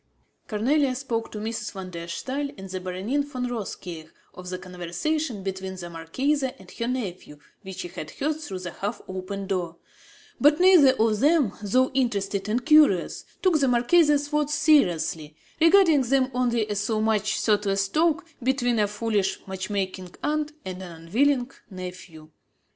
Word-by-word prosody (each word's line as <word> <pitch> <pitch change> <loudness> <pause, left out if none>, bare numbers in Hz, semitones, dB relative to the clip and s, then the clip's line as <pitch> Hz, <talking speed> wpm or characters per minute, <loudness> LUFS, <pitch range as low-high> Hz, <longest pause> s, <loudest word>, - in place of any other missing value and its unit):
Cornélie 255 +5 +2
spoke 235 -4 -3
to - - -6
Mrs. 220 0 -4
van 190 -2 -7
der 170 -1 -7
Staal 270 +11 -3
and 195 0 -8
the 185 - -3
Baronin 185 +10 -2
von 260 -3 -4
Rothkirch 180 -8 -6 0.2
of 180 0 -9
the 185 - -3
conversation 190 - -3
between 190 0 -4
the 175 -2 -8
marchesa 260 - -1
and 190 -1 -14
her 230 - -4
nephew 195 - -4 0.2
which 190 -3 -7
she - - -5
had 170 -3 -7
heard 305 - -2
through 200 -11 -5
the 180 -1 -6
half 200 +4 -4
open 190 +1 -5
door; 180 -4 -3 0.6
but 295 +2 +5
neither 355 -8 +7
of 220 -4 +1
them, 290 - +3
though 255 +6 +2
interested 205 -6 -1
and 240 +3 -1
curious, 300 - +4 0.2
took 360 -5 +4
the 275 - +3
marchesa's 290 +4 +3
words 300 0 +1
seriously, 175 - +2 0.2
regarding 330 -3 +6
them 260 +1 +1
only 240 -3 +1
as 205 -1 -2
so 215 +1 0
much 215 -1 +1
thoughtless 200 -2 +1
talk 330 - +1 0.2
between 245 -2 +1
a 210 - +3
foolish, 210 -1 -1
match 190 0 -5
making 185 -3 -3
aunt 300 0 0
and 185 0 -6
an 180 -2 -8
unwilling 250 +7 +2 0.2
nephew. 180 -4 -9
215 Hz, 160 wpm, -25 LUFS, 185-275 Hz, 0.6 s, neither